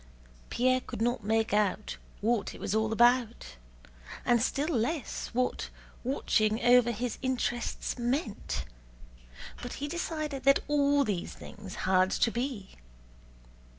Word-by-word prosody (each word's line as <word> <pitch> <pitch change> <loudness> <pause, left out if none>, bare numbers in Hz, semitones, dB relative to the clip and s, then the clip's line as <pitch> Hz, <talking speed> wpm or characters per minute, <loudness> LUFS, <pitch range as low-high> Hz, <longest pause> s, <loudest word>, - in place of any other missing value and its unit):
Pierre 255 +1 +2
could - - -7
not 240 -1 0
make 220 0 +1
out 210 0 0 0.2
what 225 0 0
it - - -11
was 190 - -2
all 220 0 +1
about, 235 - +2 0.7
and 240 -2 +4
still 280 +5 0
less 255 +6 -1
what 250 +1 -1 0.3
"watching 220 -4 +1
over 245 -1 +6
his 235 +1 -3
interests" 250 -1 -2
meant, 240 -2 -2 1.0
but 245 - -5
he 290 - -4
decided 310 -3 -3
that 275 +1 +4
all 285 -1 +3
these 200 -8 -3
things 200 -2 -10
had 185 0 +4
to 230 - +2
be. 235 -5 -3
240 Hz, 125 wpm, -30 LUFS, 215-260 Hz, 1.0 s, over